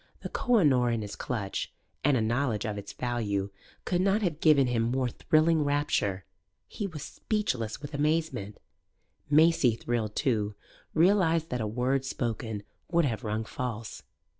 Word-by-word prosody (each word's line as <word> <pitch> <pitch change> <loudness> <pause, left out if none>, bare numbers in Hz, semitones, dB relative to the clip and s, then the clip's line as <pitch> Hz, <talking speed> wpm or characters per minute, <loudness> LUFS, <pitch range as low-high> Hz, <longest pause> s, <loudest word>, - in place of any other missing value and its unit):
The - - -5
Koh 245 -2 +2
i 200 - +4
Noor' 125 -5 +4
in 115 -2 -1
his 105 - -6
clutch 100 -6 -3 0.3
(and 140 -2 +4
a - - +1
knowledge 115 0 0
of 105 -2 -2
its 100 -1 -7
value) 105 -5 -2 0.3
could 180 -1 +1
not 200 +3 +2
have 165 -5 -1
given 150 -5 +5
him 125 -2 +1
more 125 +2 0
thrilling 155 +5 +2
rapture. 145 -10 0 0.4
He 205 - -4
was 155 -6 -7
speechless 130 - -2
with 145 - -7
amazement; 150 -8 -1 0.7
Maisie, 155 -5 +5
thrilled 115 -2 -2
too, 105 -7 0 0.4
realized 165 -2 +3
that 125 -1 -1
a 110 - -1
word 125 +5 0
spoken 115 -5 -3 0.3
would 170 -2 +3
have 120 -2 -2
rung 110 0 -2
false. 115 -2 -5
125 Hz, 160 wpm, -29 LUFS, 110-155 Hz, 0.7 s, given